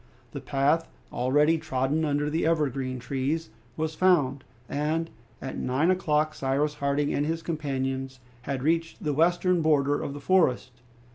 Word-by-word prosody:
The - - -6
path, 145 +4 +1 0.2
already 150 +6 +3
trodden 145 0 -1
under 145 0 0
the 160 +3 -1
evergreen 135 -5 0
trees, 135 +6 -2 0.3
was 160 0 -1
found, 150 -7 +2 0.2
and 155 +4 -1 0.3
at 135 - -5
nine 140 +8 +1
o'clock 155 -4 +1
Cyrus 140 +2 0
Harding 145 0 0
and 145 - +1
his 165 +1 -2
companions 135 -4 -3 0.2
had 130 0 -4
reached 165 +2 0
the 150 -2 0
western 175 +3 +2
border 145 -2 +2
of 140 - -4
the - - -6
forest. 145 -6 +2
150 Hz, 145 wpm, -27 LUFS, 135-160 Hz, 0.3 s, already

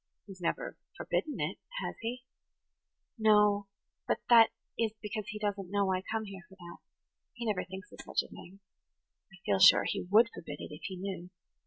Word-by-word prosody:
"He 200 - -11
has 185 -1 -12
never 170 - -2 0.2
forbidden 300 - -2
it, - - -2 0.2
has - - -3
he?" 245 +2 -4 0.9
"No, 210 -2 +4 0.4
but - - +2
that 230 -2 +8 0.3
is 225 -2 0
because 210 -1 -5
he 210 - -5
doesn't 200 -3 -2
know 200 -1 +1
I 185 - 0
come 220 +3 -3
here 195 -2 -8
for 190 - -15
that. 175 -2 -11 0.6
He 240 -1 -6
never 210 -4 0
thinks 190 +3 -9
of - - -13
such - - 0
a - - -12
thing. 190 +3 -12 0.7
I 195 - -14
feel 100 -2 +2
sure - - +8
he - - -1
would 225 +3 +6
forbid 145 -3 -8
it, - - -7
if 150 - -10
he 190 -1 -5
knew. 185 -1 -5
200 Hz, 190 wpm, -32 LUFS, 185-220 Hz, 0.9 s, that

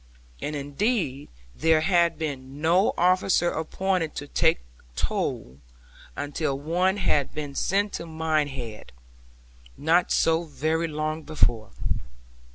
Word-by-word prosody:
And 150 - -3
indeed 145 - -1 0.2
there 160 0 +3
had 170 -2 +3
been 140 -3 -5
no 170 +6 +3
officer 180 -1 +3
appointed 175 0 -1
to 145 - -5
take - - +2 0.3
toll, 65 +2 -2 0.6
until 145 0 -2
one 180 +6 +1
had 150 -7 +1
been 145 -2 -4
sent 200 +7 0
to 170 - -5
Minehead, 145 - -2 0.8
not 170 +4 +3
so 165 +1 +3
very 160 +2 -1
long 155 0 -2
before. 120 -8 +1
155 Hz, 110 wpm, -26 LUFS, 145-170 Hz, 0.8 s, there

